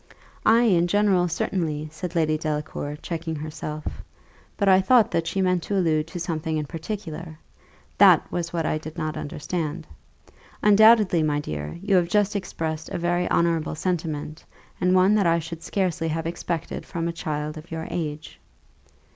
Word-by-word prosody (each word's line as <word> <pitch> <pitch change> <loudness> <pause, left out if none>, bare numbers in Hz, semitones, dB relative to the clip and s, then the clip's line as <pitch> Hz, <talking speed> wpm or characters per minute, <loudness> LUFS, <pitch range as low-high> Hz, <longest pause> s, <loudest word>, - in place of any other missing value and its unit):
"Ay, 230 +2 +6
in 175 -7 +3
general, 195 -2 +3
certainly," 160 -3 -2
said 170 +3 -6
Lady 155 -2 +2
Delacour, 150 -1 -3
checking 165 -1 -4
herself; 155 0 -6 0.7
"but 200 - +1
I 190 0 +6
thought 235 +2 +4
that 165 0 0
she 195 +2 0
meant 180 -1 +2
to 200 +5 -3
allude 155 -4 +1
to 170 +2 -6
something 160 -1 -2
in 150 - -2
particular 165 -1 -6 0.6
that - - +7
was 170 -1 -3
what 165 -2 -1
I 155 - 0
did 155 +2 -9
not 155 -2 -2
understand. 150 +1 -4 0.8
Undoubtedly, 210 -4 +6
my 150 -1 +1
dear, 75 - -5
you 195 -2 +3
have 170 -1 +2
just 210 +1 +2
expressed 160 -5 -3
a - - -3
very 175 +1 0
honourable 165 -2 +1
sentiment, 155 -3 -3 0.4
and 180 +1 +3
one 185 +2 +5
that 205 -4 +3
I 165 0 +4
should 165 0 -6
scarcely 180 -4 -1
have 160 +1 -2
expected 165 -1 -4
from 170 0 -3
a 170 - -2
child 150 -2 -3
of 155 +1 -10
your 160 0 -5
age. 155 -3 -5
165 Hz, 165 wpm, -24 LUFS, 155-180 Hz, 0.8 s, that